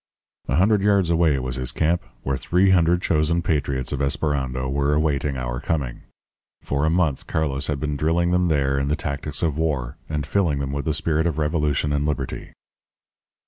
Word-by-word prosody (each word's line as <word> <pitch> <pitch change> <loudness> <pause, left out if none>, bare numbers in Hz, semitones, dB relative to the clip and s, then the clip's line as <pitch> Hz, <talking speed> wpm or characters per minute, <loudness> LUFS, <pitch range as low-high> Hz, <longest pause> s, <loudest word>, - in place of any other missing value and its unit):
"A 65 - 0
hundred 100 +5 +3
yards 100 -4 +3
away 80 -4 +3
was 65 -1 -3
his 65 -1 -2
camp, 80 +7 +1 0.2
where 65 - 0
three 90 +8 +2
hundred 90 0 +3
chosen 80 +2 +1
patriots 70 -5 -1
of 70 - -2
Esperando 70 -3 -1
were 70 +2 +1
awaiting 75 -2 0
our - - -3
coming. 70 -6 -2 0.6
For 70 +2 0
a - - +3
month 80 -5 0
Carlos 75 -3 -1
had 75 -2 -1
been 75 -1 -2
drilling 85 +4 +1
them 90 0 +2
there 70 -3 +1
in 70 - -1
the 75 - +1
tactics 75 -2 -4
of 80 -2 0
war, 70 -7 -1
and 75 -2 -2
filling 85 -5 +1
them 70 -1 -3
with 70 0 -3
the 80 -2 0
spirit 80 +1 +1
of 80 -3 -2
revolution 75 -2 0
and 75 +1 0
liberty. 75 -3 -4
75 Hz, 185 wpm, -23 LUFS, 70-80 Hz, 0.6 s, hundred